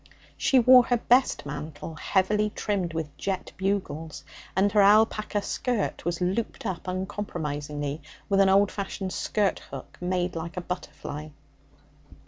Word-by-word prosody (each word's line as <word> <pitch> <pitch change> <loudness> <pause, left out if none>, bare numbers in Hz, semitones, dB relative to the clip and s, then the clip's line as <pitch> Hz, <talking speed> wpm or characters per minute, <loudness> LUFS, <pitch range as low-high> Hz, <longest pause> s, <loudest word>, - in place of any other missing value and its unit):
She 265 - +3
wore 250 0 +8
her 245 - +2
best 250 - +3
mantle, 150 +2 -6
heavily 210 +6 +1
trimmed 195 -5 -1
with 160 -3 -4
jet 190 -2 -3
bugles, 190 -5 -2 0.3
and 195 +2 +3
her 210 - +5
alpaca 215 0 +4
skirt 245 -5 -2
was 170 -1 -1
looped 190 +6 -2
up 185 -3 -4
uncompromisingly 150 -6 -3 0.3
with 195 -1 +2
an 195 -1 +6
old 200 +1 +4
fashioned 195 -1 -4
skirt 205 -3 0
hook 135 -2 -9
made 180 0 -1
like 165 +2 -5
a - - -1
butterfly. 155 -4 -6
190 Hz, 135 wpm, -27 LUFS, 165-205 Hz, 0.3 s, wore